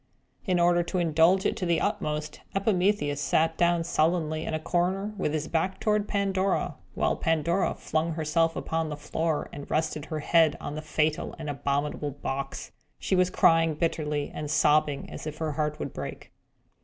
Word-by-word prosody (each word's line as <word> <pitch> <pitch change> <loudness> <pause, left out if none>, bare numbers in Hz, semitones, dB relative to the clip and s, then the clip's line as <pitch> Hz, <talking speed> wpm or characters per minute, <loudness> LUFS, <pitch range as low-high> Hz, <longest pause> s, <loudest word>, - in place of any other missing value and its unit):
In 180 -2 +2
order 175 0 +4
to 175 +2 -3
indulge 170 +3 +3
it - - +1
to 185 - -2
the 170 -1 +2
utmost, 150 0 -2 0.2
Epimetheus 195 -7 +1
sat 160 +3 +2
down 170 0 +2
sullenly 160 -1 0
in - - -2
a - - -1
corner 185 +5 0
with 190 -6 -1
his 155 0 -2
back 185 +3 -1
toward 210 -1 +1
Pandora; 195 -1 0 0.2
while - - +1
Pandora 165 +2 +1
flung 160 +1 -1
herself 165 +1 +1
upon 160 -1 -2
the 150 - -5
floor 155 +1 -1
and 145 0 -8
rested 155 -1 -1
her 155 -1 -4
head 165 0 +4
on - - -5
the 155 - -4
fatal 155 0 -1
and 155 -2 -4
abominable 145 +1 -1
box. 135 -1 -5 0.3
She - - 0
was 185 0 +3
crying 165 -3 +4
bitterly, 150 -3 -1
and 150 -1 -5
sobbing 150 -1 +2
as - - -7
if 155 0 -5
her 160 -1 -2
heart 150 0 -1
would - - -5
break. - - -7
160 Hz, 175 wpm, -27 LUFS, 150-175 Hz, 0.3 s, order